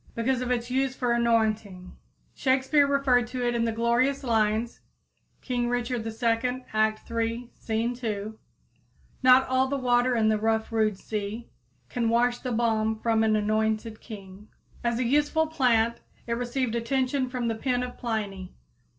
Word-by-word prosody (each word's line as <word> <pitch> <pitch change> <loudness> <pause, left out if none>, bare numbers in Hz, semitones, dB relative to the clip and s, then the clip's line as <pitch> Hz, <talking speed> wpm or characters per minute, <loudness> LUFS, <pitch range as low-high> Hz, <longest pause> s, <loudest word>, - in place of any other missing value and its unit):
Because 250 +2 0
of 250 - -3
its 245 0 -1
use 265 0 0
for 245 -2 -1
anointing, 220 -5 0 0.4
Shakespeare 270 +2 +2
referred 270 -4 +2
to 250 0 -2
it 240 - +1
in 235 -1 +1
the 230 - 0
glorious 240 +5 +1
lines 225 -1 0 0.6
(King 245 -2 -1
Richard 245 -1 -1
II., 230 +3 -1
act 215 +1 0
iii, 230 +1 -2
scene 225 +2 -1
2): 220 -3 -4 0.9
"Not 255 0 +6
all 260 +1 +2
the 280 +1 -1
water 245 -1 +2
in 220 -2 +2
the 215 -1 +2
rough, 220 +1 0
rude 215 -3 +1
sea 215 +3 -5 0.4
Can 235 -3 -1
wash 240 +1 +2
the 255 - -4
balm 220 -1 +1
from 225 -1 +2
an 215 -1 +3
anointed 215 +1 -1
king." 200 -2 -11 0.4
As 235 -1 0
a 255 - 0
useful 295 +5 +2
plant 240 -7 +2 0.3
it 235 - -2
received 245 0 -2
attention 255 +2 0
from 250 -2 -2
the 225 - 0
pen 250 +2 -1
of 250 0 -7
Pliny. 205 -5 -4
235 Hz, 160 wpm, -27 LUFS, 220-250 Hz, 0.9 s, Not